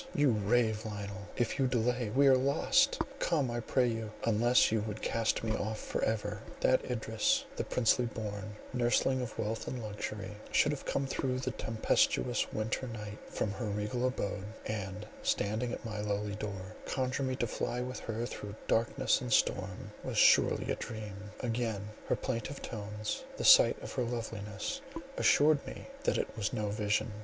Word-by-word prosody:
you 145 -2 +4
rave, 110 +1 +2
Lionel! 100 -2 -6
If 120 +3 0
you 135 - +4
delay 125 -1 +1
we 140 +6 +4
are 135 -1 +8
lost; 140 - +3 0.2
come, 145 -8 +1
I 120 - -1
pray 125 +2 +2
you, 115 -2 -2
unless 115 +2 +4
you 110 -1 +2
would 105 0 -5
cast 115 0 +1
me 110 -1 0
off 110 +1 -2
for - - -3
ever." 105 -1 -1 0.2
That 130 - +4
Idris, 110 -3 +1
the - - -1
princely 120 0 +2
born, 105 -2 -5 0.2
nursling 130 +1 +2
of 125 -3 -5
wealth 110 +1 -2
and 130 - -3
luxury, 105 -2 -5 0.2
should 150 - +4
have 145 - -5
come 135 - 0
through 130 -1 -1
the 130 0 -2
tempestuous 110 - +1
winter 110 +4 -2
night 105 -3 -6
from 105 - -1
her 115 +3 -4
regal 105 +4 -1
abode, 100 -6 -2 0.2
and 95 -3 -4 0.2
standing 110 +4 0
at - - -6
my 105 -2 -3
lowly 105 0 -1
door, 100 -1 -5
conjure 130 0 -1
me 130 -1 0
to 120 - 0
fly 120 +2 -2
with 125 +1 -4
her 115 +1 -3
through 105 -3 -6
darkness 115 0 +2
and - - -4
storm—was - - 0
surely - - +5
a - - +1
dream—again 105 0 -4 0.2
her - - +2
plaintive 130 +2 -3
tones, 105 - -4
the - - -2
sight - - +8
of - - -6
her 130 - 0
loveliness 115 - -4 0.4
assured 145 0 +5
me - - -7 0.2
that - - +3
it - - -2
was 110 -3 -1
no 105 -1 -1
vision. 105 +2 0
110 Hz, 170 wpm, -32 LUFS, 105-125 Hz, 0.4 s, are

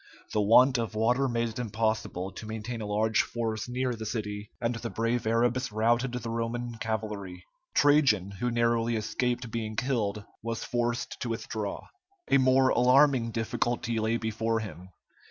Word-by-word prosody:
The 105 - +2
want 125 +5 +6
of 115 -2 -3
water 125 +5 +2
made 115 -1 0
it 115 - -7
impossible 110 -4 -1
to 105 +3 -9
maintain 110 +1 -5
a 105 - -4
large 110 +2 +2
force 115 -1 -3
near 125 0 -1
the 110 -1 -6
city, 105 -1 -4
and 120 0 0
the 115 0 -5
brave 115 +3 -1
Arabs 120 +1 +1
routed 120 +4 +1
the 120 -1 -4
Roman 115 0 -3
cavalry. 105 -5 -4 0.3
Trajan, 135 -10 +4
who 125 +1 0
narrowly 115 0 +1
escaped 120 +2 -2
being 110 -1 -3
killed, 105 -5 -1 0.2
was 115 0 -3
forced 120 0 -2
to 120 - -3
withdraw. 110 -2 -4 0.5
A 140 - +6
more 130 0 +4
alarming 130 -1 +4
difficulty 115 +1 -1
lay 110 +1 +1
before 115 0 -1
him. 95 -4 -8
115 Hz, 155 wpm, -28 LUFS, 110-120 Hz, 0.5 s, want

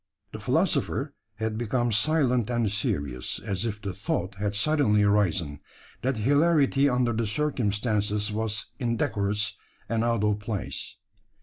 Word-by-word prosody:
The - - -7
philosopher - - 0 0.2
had 110 0 -3
become 120 +1 0
silent 125 -1 +2
and 120 -4 +1
serious; 70 -11 -1
as 100 0 -2
if 105 -1 -4
the 100 -2 -4
thought 90 +1 -2
had 100 +1 -2
suddenly 110 -4 +3
arisen, 95 -8 +1 0.4
that 130 0 0
hilarity 145 +2 +3
under 125 -2 +1
the 110 0 -1
circumstances 105 -5 0
was 110 0 -2
indecorous 105 -4 0 0.3
and 115 0 0
out 115 -2 +1
of 105 -1 +1
place. 105 -1 -4
110 Hz, 130 wpm, -27 LUFS, 105-120 Hz, 0.4 s, suddenly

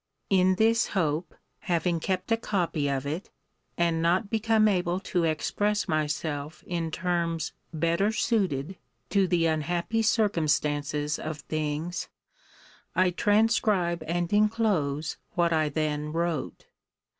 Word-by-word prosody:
In 185 -1 +4
this 225 +3 +3
hope, 160 -1 -1 0.2
having 170 0 0
kept 185 +4 -2
a - - +6
copy 170 -9 -1
of 135 0 -1
it, 155 +7 -4 0.5
and 170 -1 +1
not 180 +5 +1
become 220 -1 +3
able 180 -3 +1
to 175 -3 0
express 205 +6 0
myself 150 0 -2
in 170 -2 -2
terms 170 -1 -1 0.2
better 170 +6 +1
suited 190 - 0 0.3
to 195 -2 +3
the 175 -2 +2
unhappy 170 +7 0
circumstances 150 -8 +1
of 155 -2 -5
things, 155 +3 -3 0.9
I 185 0 +3
transcribe 205 -4 +2
and 175 +2 -1
enclose 205 -9 +1 0.2
what 170 -1 +2
I 155 -1 +2
then 150 0 -2
wrote. 165 -4 -2
170 Hz, 120 wpm, -27 LUFS, 155-195 Hz, 0.9 s, a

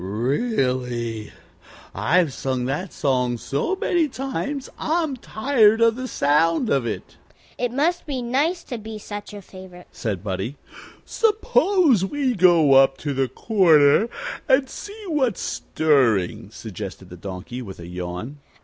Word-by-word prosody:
Really, 125 - -1 0.6
I've 165 -3 +2
sung 130 -2 -2
that 150 +8 -3
song 125 -3 0
so 140 - -2
many 345 -4 +1
times 275 +1 -4
I'm 315 -3 0
tired 225 -2 +2
of 230 -1 +4
the 255 +1 -5
sound 165 - +2
of 135 -4 +1
it." 110 - -6 0.4
"It 245 -1 0
must 320 +8 0
be 275 -3 -2
nice 300 +9 0
to 245 - -6
be 220 0 -7
such 205 0 -8
a 205 -1 -9
favorite," 185 -1 -12
said 100 -6 -4
Buddie. 100 +7 -4 0.5
"Suppose 400 - +2
we 265 +5 0
go 170 -7 +5
up 135 0 +5
to 145 0 -3
the 135 0 +1
Corner 165 - +4 0.4
and 265 0 +4
see 415 +9 -9
what's 265 - 0
stirring," 130 - +1
suggested - - -8
the - - -8
Donkey, 100 +6 -7
with 95 -7 -9
a 85 - -8
yawn. 90 +10 -6
180 Hz, 140 wpm, -23 LUFS, -, 0.6 s, go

